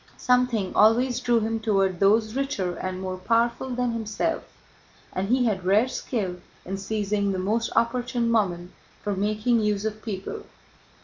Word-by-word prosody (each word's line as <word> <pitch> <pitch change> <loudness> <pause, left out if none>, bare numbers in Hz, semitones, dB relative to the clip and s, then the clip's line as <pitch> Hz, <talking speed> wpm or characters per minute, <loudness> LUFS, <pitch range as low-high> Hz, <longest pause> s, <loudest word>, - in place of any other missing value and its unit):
Something 250 -6 +1
always 235 +4 +4
drew 240 -2 +2
him 225 +1 -1
toward 195 -5 +1
those 215 +2 +3
richer 235 -10 -2
and 185 0 -4
more 185 0 -4
powerful 235 +6 +1
than 250 -1 -1
himself 230 +8 -2 0.7
and 195 +2 -2
he 250 +1 +3
had 200 -5 0
rare 205 +6 +4
skill 205 -8 -3 0.3
in 195 +2 -4
seizing 205 0 -1
the 190 - -2
most 215 +5 0
opportune 240 0 +1
moment 180 -5 0 0.3
for 205 -1 -1
making 215 +4 +1
use 210 -1 0
of 215 0 -3
people. 195 -4 -5
215 Hz, 150 wpm, -25 LUFS, 195-235 Hz, 0.7 s, always